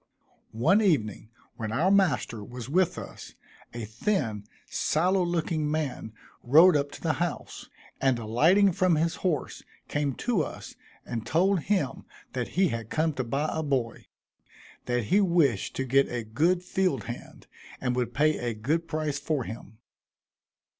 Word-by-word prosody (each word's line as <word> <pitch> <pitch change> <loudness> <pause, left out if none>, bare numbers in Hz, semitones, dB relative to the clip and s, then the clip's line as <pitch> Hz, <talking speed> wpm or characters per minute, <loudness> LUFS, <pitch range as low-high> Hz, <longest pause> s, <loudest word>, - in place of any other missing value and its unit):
One 190 - +4
evening, 110 - 0 0.3
when 110 -2 -4
our 165 +11 +2
master 180 - +2
was 120 +2 -8
with 180 +4 +1
us, - - -9 0.4
a 120 -2 -5
thin, 110 - -2 0.2
sallow 180 +4 +1
looking 165 -3 -1
man 145 -8 -3 0.3
rode 160 +8 +6
up 145 -1 +1
to - - -10
the 160 -2 +1
house, 175 -3 -4 0.3
and 130 -2 +3
alighting 160 - +4
from 180 -1 +2
his 165 +2 0
horse, 170 -7 -2 0.3
came 145 -3 -1
to 235 -8 0
us, - - -7 0.3
and 115 -2 -4
told 185 - +2
him 185 -11 0 0.3
that 125 -2 -2
he 190 -2 +4
had 115 -3 -5
come 160 0 0
to 130 - -2
buy 135 +6 -1
a 160 - -1
boy; 130 -6 -2 0.8
that 125 -1 0
he 195 - +3
wished 165 - +2
to 135 - -2
get 135 +2 +3
a 120 -1 -3
good 165 +12 +1
field 180 - 0
hand, 120 +2 -9 0.3
and 125 -2 -1
would 125 -1 -2
pay 155 +1 +2
a 120 -2 -2
good 155 +10 -1
price 155 -2 -2
for 145 -2 -1
him. 110 -1 -9
145 Hz, 155 wpm, -27 LUFS, 120-175 Hz, 0.8 s, rode